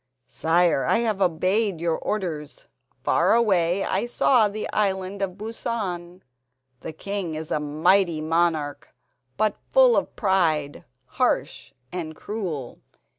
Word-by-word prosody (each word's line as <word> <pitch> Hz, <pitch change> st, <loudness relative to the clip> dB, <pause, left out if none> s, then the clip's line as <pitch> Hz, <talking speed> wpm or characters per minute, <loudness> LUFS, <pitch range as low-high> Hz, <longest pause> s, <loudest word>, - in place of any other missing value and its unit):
"Sire, 165 Hz, -3 st, +2 dB
I -, -, +2 dB
have 220 Hz, -4 st, -1 dB
obeyed 185 Hz, +2 st, +1 dB
your 165 Hz, -1 st, 0 dB
orders. 160 Hz, -8 st, -4 dB, 0.4 s
Far 180 Hz, +6 st, +3 dB
away 195 Hz, -5 st, +2 dB
I 195 Hz, +5 st, -1 dB
saw 240 Hz, -2 st, +3 dB
the 210 Hz, +1 st, -4 dB
Island 195 Hz, -1 st, -1 dB
of 190 Hz, -1 st, -3 dB
Busan. 195 Hz, -5 st, -4 dB, 0.6 s
The -, -, -7 dB
king 185 Hz, 0 st, -4 dB
is 155 Hz, 0 st, -6 dB
a -, -, +1 dB
mighty 155 Hz, +4 st, +2 dB
monarch, 155 Hz, -2 st, -1 dB, 0.4 s
but 215 Hz, 0 st, +1 dB
full -, -, +6 dB
of -, -, -1 dB
pride, 165 Hz, -, 0 dB, 0.2 s
harsh -, -, -1 dB, 0.2 s
and 160 Hz, -3 st, -5 dB
cruel. 170 Hz, -, -5 dB
185 Hz, 125 wpm, -24 LUFS, 160-205 Hz, 0.6 s, full